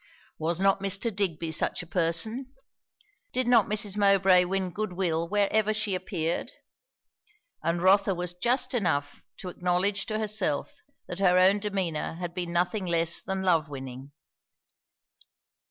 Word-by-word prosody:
Was 165 +2 -1
not 195 0 +3
Mr. 195 +3 0
Digby 165 -5 -2
such 160 - -1
a - - -11
person? 195 +10 -1 0.8
did 255 0 0
not 245 0 +4
Mrs. 205 -2 -1
Mowbray 195 -3 +5
win 190 0 -2
good 215 0 -4
will 170 -2 -1
wherever 210 +1 +1
she 210 -2 -1
appeared? 175 -3 -2 1.1
and 170 +1 -1
Rotha 195 0 +4
was 175 0 -4
just 240 +10 0
enough 160 - -1 0.2
to 185 - -7
acknowledge 180 +3 0
to 215 - -2
herself 210 - -1 0.3
that 180 - -6
her 180 -2 +4
own 190 +3 +5
demeanour 190 -7 -2
had 175 0 -6
been 175 -1 -3
nothing 180 +3 0
less 170 -1 0
than 190 0 -3
love 165 -5 +2
winning. 135 0 -8
185 Hz, 140 wpm, -27 LUFS, 170-205 Hz, 1.1 s, Mowbray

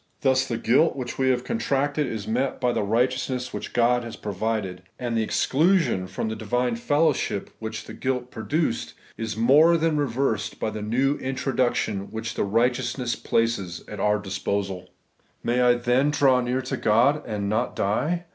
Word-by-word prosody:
Thus 130 -1 +2
the 115 - -2
guilt 130 +8 +3
which 125 -2 -5
we 130 0 +3
have 125 -1 +1
contracted 145 - 0
is 110 -4 -5
met 125 +4 -1
by 125 -1 +1
the - - 0
righteous 125 +6 +1
ness 125 -1 -3
which - - -5
God 120 +1 +2
has 115 -1 -7
provided; 105 -2 -3 0.2
and 120 -2 -3
the 115 - +2
exclusion 150 - +2
from 95 +4 -3
the 110 - -3
divine 120 +3 -1
fellowship, 145 -4 0
which 110 -1 -5
the - - -9
guilt 125 -1 -2
pro 110 - -7
duced, 150 -2 -1 0.2
is 115 -1 -4
more 150 +9 +5
than 160 -1 +1
reversed 135 -4 -1
by 110 - -1
the 105 - -5
new 130 +7 +1
introduc 130 -1 0
tion 100 -1 -2
which 110 0 -5
the - - -1
righteousness 120 +3 0
places 115 -7 -1
at 105 - -7
our 105 +1 +2
disposaL 100 -2 -3 0.6
May 120 +1 +1
I 125 0 +5
then 125 +4 +2
draw 135 -3 +3
near 125 +2 -1
to 130 - -3
God, 125 +8 +3
and 105 -3 -2
not 110 +4 -1
die? 155 - 0
120 Hz, 180 wpm, -25 LUFS, 110-135 Hz, 0.6 s, more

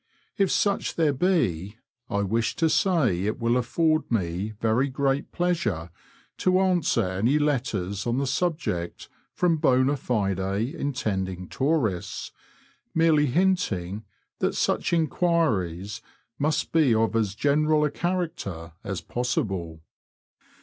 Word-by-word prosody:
If 195 -2 +2
such 200 -1 0
there 155 -3 +2
be, 115 - 0 0.3
I 100 - 0
wish 110 +3 0
to 165 -2 +2
say 130 - +2
it 110 +3 -2
wiU 115 0 +2
a 125 - +3
ford 155 +5 +1
me 95 -1 -1
very 115 +4 +2
great 135 +1 -1
pleasure 110 - -1 0.5
to 185 - +2
cmswer 175 - +2
any 125 +8 +3
letters 115 -9 -1
on 120 +1 0
the 140 - 0
subject 135 - -2 0.2
from 170 -2 +1
^ - - -10
bona 130 +2 +3
fide 100 -8 -1
intending 95 -3 -2
tourists, 130 - -1 0.6
merely 160 -2 +4
hinting 120 - 0 0.4
that - - 0
such - - 0
enquiries, 115 - 0 0.4
must 150 +2 0
be 150 -8 +4
of 115 0 +1
as 105 -3 0
general 150 +3 +2
a 150 - -1
character 150 - -3
as - - -4
possible. 95 - -2
125 Hz, 125 wpm, -26 LUFS, 100-160 Hz, 0.6 s, merely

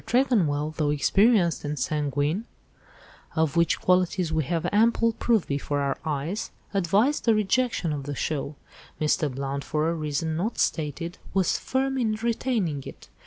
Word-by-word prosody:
Tregonwell, 165 - +2
though 150 -3 +1
experienced 185 +4 +3
and 150 0 -3
sanguine—of 150 - -3
which 170 0 +2
qualities 180 -2 +1
we 160 -1 +1
have 165 +3 -1
ample 230 +2 +3
proof 225 -3 +1
before 145 0 -2
our 140 -1 -1
eyes—advised 195 - -1
the 225 -2 +5
rejection 215 -5 +1
of 140 -2 -5
the 145 0 -4
'show.' 145 +1 -3 0.4
Mr. 150 -1 +1
Blount, 135 +1 -3
for 155 +1 0
a - - -1
reason 155 0 -2
not 205 +8 -2
stated, 165 +2 -1 0.2
was 190 -3 +2
firm 265 0 -1
in 220 -3 +1
retaining 225 - -1
it. - - -11
165 Hz, 140 wpm, -26 LUFS, 150-215 Hz, 0.4 s, the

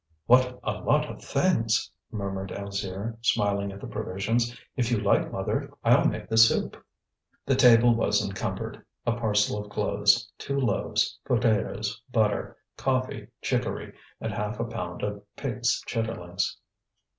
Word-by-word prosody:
"What 125 +1 +4
a 105 -1 -2
lot 150 0 +2
of - - -11
things!" 125 -7 +1 0.2
murmured 95 -2 -4
Alzire, 100 +2 -4
smiling 100 -3 +1
at 100 - -9
the - - -8
provisions. 110 +4 -1 0.2
"If 120 -3 0
you 120 - +2
like, 105 -1 +2
mother, - - -2
I'll - - +5
make - - -3
the 110 - -1
soup." 115 0 +5 0.7
The 135 - +2
table 120 -2 +7
was 115 - +2
encumbered: - - -4 0.2
a 120 - +2
parcel 105 -3 +1
of 105 - -13
clothes, 105 +1 +2
two 140 0 -2
loaves, 115 -7 0
potatoes, 110 -1 0
butter, 110 -3 +1 0.2
coffee, 130 -1 -1 0.2
chicory, - - -2 0.3
and - - -3
half 105 +2 -3
a 115 - 0
pound 110 -6 -5
of 105 0 -3
pig's 120 -4 0
chitterlings. 100 -7 -2
110 Hz, 140 wpm, -27 LUFS, 100-120 Hz, 0.7 s, table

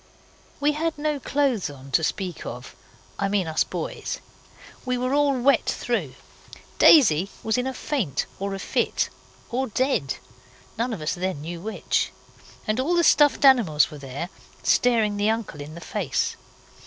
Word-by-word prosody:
We 290 +1 +3
had 315 +1 -2
no 300 -1 -1
clothes 265 - 0
on 135 -1 -11
to 160 - +3
speak 180 +1 -2
of - - -8 0.4
I 200 - +1
mean 195 -2 +1
us 160 -1 +1
boys. - - -4 0.7
We 250 -1 -1
were 255 +2 -1
all 285 -2 +3
wet 275 +3 +3
through. - - -1 0.6
Daisy 195 - +6
was 220 - +1
in 250 +1 0
a 265 - -2
faint 220 - -1
or 195 0 -2
a - - -4
fit, - - 0 0.4
or 260 +2 0
dead, 240 - 0 0.6
none 235 +3 -1
of 210 -8 -4
us 155 - -1
then 185 -4 -3
knew 170 +2 -6
which. 220 +3 -1 0.5
And 215 +3 0
all 315 +7 +1
the 340 - +3
stuffed 295 -3 +5
animals 215 - +5
were 150 - -9
there 140 +5 -5 0.3
staring 225 -4 +3
the 205 +1 +2
uncle 220 -9 -2
in 150 +2 -8
the 170 - -9
face. - - -1
220 Hz, 165 wpm, -24 LUFS, 170-265 Hz, 0.7 s, Daisy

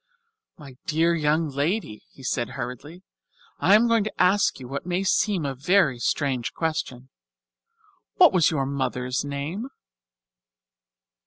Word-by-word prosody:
"My 140 -6 -13
dear 165 +2 +2
young 155 0 +1
lady," 140 - -2
he 135 - -16
said 120 -1 -1
hurriedly, 135 +8 -7 0.6
"I 195 - +5
am 230 +3 +4
going 230 -2 +3
to 215 - -7
ask 190 -1 +3
you 125 - -9
what 140 +2 -5
may 180 +2 -1
seem 195 -3 +1
a 135 - -2
very 140 -1 +2
strange 130 -1 -1
question. 130 -6 -3 1.1
What 355 -4 +6
was 170 -4 +4
your 145 -5 -1
mother's 130 -2 -2
name?" 145 - -5
150 Hz, 135 wpm, -24 LUFS, 135-185 Hz, 1.1 s, What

